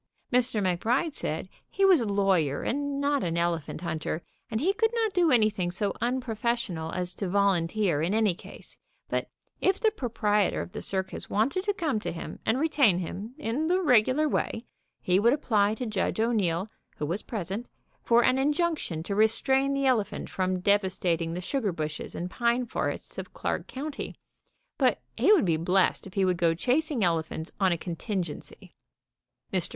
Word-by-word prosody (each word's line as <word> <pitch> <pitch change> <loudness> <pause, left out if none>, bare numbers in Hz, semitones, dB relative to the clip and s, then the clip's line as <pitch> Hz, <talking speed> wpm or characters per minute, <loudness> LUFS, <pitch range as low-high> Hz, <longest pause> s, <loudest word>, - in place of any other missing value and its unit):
Mr. 235 -4 +3
McBride 235 - +1
said 160 - -3 0.2
he 390 - +2
was 370 -8 +6
a 225 - -1
lawyer 185 -8 +2
and 285 +1 -1
not 285 0 +1
an 170 -1 -1
elephant 170 -2 -1
hunter, 160 -1 -3 0.3
and 220 - -1
lie 365 +9 +2
could 450 +1 +3
not 445 -3 +1
do 350 -2 +3
anything 215 -8 +2
so 195 +3 -1
unprofessional 235 -8 -1
as 180 -1 -3
to 195 - -4
vol 200 +1 +4
unteer 170 -2 0
in 170 - 0
any 215 -3 +3
case, - - -10 0.3
but - - -1 0.3
if 385 0 +2
the 440 - +3
proprietor 210 - 0
of - - -5
the - - -6
circus 190 -1 -3
wanted 260 - +1
to 410 - +1
come 310 - 0
to - - -4
him 165 - -7
and 225 +4 +2
retain 280 - +3
him, 195 +7 -5
in 300 +2 -1
the 365 +2 +3
regular 265 - +4
way, 235 -4 -2 0.4
he 180 +1 +3
would 235 +4 +4
apply 215 -7 +2
to 250 - -4
Judge 215 -1 -1
O'Neil, 200 -6 +1 0.3
who 150 - -2
was 175 +7 -2
pres 195 -6 -5
ent, 225 +5 -4 0.3
for 235 0 +4
an 255 +2 +3
injunction 295 - 0
to 200 - -3
restrain 265 +6 +3
the 275 0 0
elephant 235 -6 0
from 185 -1 -1
devastating 180 -4 +1
the 180 - -3
sugar 220 +1 -1
bushes 155 -2 -5
and 180 +1 -4
pine 240 +1 +1
forests - - -3
of - - -8
Clark - - -2
county, 285 +2 -5 0.6
but - - +3 0.2
he - - +4
would 385 - +5
be 165 -3 +2
blessed 185 +4 +2
if 190 - -14
he 195 -1 +3
would 180 -1 +1
go 170 -1 +2
chas 265 - +1
ing 255 -9 0
elephants 160 -2 -1
on 190 -2 +3
a 170 - +1
contingency. 175 0 -5 0.8
Mr. - - 0
215 Hz, 180 wpm, -28 LUFS, 180-265 Hz, 0.8 s, was